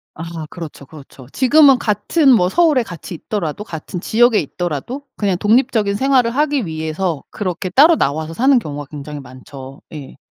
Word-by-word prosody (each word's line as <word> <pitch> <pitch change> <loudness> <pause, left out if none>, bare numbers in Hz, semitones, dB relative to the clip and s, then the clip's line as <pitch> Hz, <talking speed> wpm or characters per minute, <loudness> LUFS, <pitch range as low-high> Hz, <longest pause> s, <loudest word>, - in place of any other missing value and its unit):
아 165 -1 -7
그렇죠, 160 -5 -9
그렇죠. 135 -3 -14
지금은 275 +1 +5
같은 235 - +1
뭐 180 -7 +4
서울에 310 - +3
같이 175 -4 -9
있더라도 170 0 -4
같은 170 -1 -7
지역에 235 +1 +3
있더라도 175 - -5
그냥 195 -4 -1
독립적인 220 -1 +1
생활을 255 0 +2
하기 285 -2 0
위해서 160 0 -3
그렇게 185 -2 -4
따로 300 - +6
나와서 155 - -2
사는 260 +8 +3
경우가 145 -9 -4
굉장히 150 0 -8
많죠. 130 +1 -12
예. 145 -4 -10
185 Hz, 375 characters per minute, -18 LUFS, 155-250 Hz, -, 따로